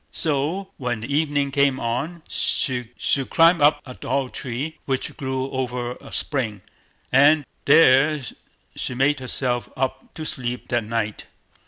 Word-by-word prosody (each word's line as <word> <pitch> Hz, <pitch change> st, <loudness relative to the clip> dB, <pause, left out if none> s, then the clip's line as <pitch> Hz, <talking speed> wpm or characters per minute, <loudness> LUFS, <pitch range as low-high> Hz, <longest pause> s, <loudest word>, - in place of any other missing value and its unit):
So, 160 Hz, +6 st, 0 dB
when 120 Hz, -4 st, -2 dB
the 140 Hz, +5 st, -3 dB
evening 145 Hz, -2 st, +1 dB
came 140 Hz, -1 st, +2 dB
on, 140 Hz, +9 st, -3 dB
she 125 Hz, -5 st, 0 dB, 0.4 s
clomb 165 Hz, 0 st, +5 dB
up 145 Hz, 0 st, +5 dB
into 130 Hz, -, -9 dB
a -, -, -7 dB
tall 130 Hz, +1 st, -2 dB
tree, 140 Hz, +7 st, -5 dB
which 135 Hz, -2 st, -2 dB
grew 130 Hz, -1 st, -3 dB
over 125 Hz, -2 st, -2 dB
a -, -, -12 dB
spring, 110 Hz, -9 st, -2 dB, 0.5 s
and 145 Hz, +3 st, +5 dB, 0.2 s
there 150 Hz, 0 st, +6 dB, 0.6 s
she 130 Hz, -, -4 dB
made 140 Hz, +3 st, +2 dB
herself 125 Hz, -1 st, -2 dB
up 130 Hz, 0 st, -2 dB
to 155 Hz, -, -5 dB
sleep 125 Hz, -4 st, -3 dB
that 120 Hz, -2 st, 0 dB
night. 110 Hz, -1 st, -3 dB
135 Hz, 145 wpm, -23 LUFS, 125-145 Hz, 0.6 s, there